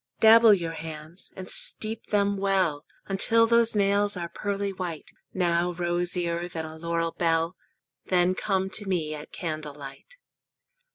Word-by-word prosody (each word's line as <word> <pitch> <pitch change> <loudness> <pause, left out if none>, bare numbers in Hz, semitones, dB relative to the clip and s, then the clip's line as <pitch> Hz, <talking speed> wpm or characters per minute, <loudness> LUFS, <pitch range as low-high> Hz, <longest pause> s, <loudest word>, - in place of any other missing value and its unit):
Dabble 225 -1 +8
your 170 -3 -3
hands, 160 +2 -8
and 185 -1 -8
steep 220 +1 -3
them 200 -1 +1
well 190 -7 0 0.2
Until 225 +4 +3
those 235 -1 +3
nails 200 0 +2
are 170 -1 -4
pearly 200 0 -3
white 175 -5 -6 0.2
Now 175 -1 +1
rosier 175 0 -1
than 160 -2 -5
a 160 0 -8
laurel 165 0 -1
bell; 165 +1 0 0.5
Then 180 0 +3
come 190 0 -1
to 205 0 -3
me 160 -5 -1
at 150 0 -8
candle 155 -3 -5
light. 140 - -11
180 Hz, 140 wpm, -26 LUFS, 165-200 Hz, 0.5 s, Dabble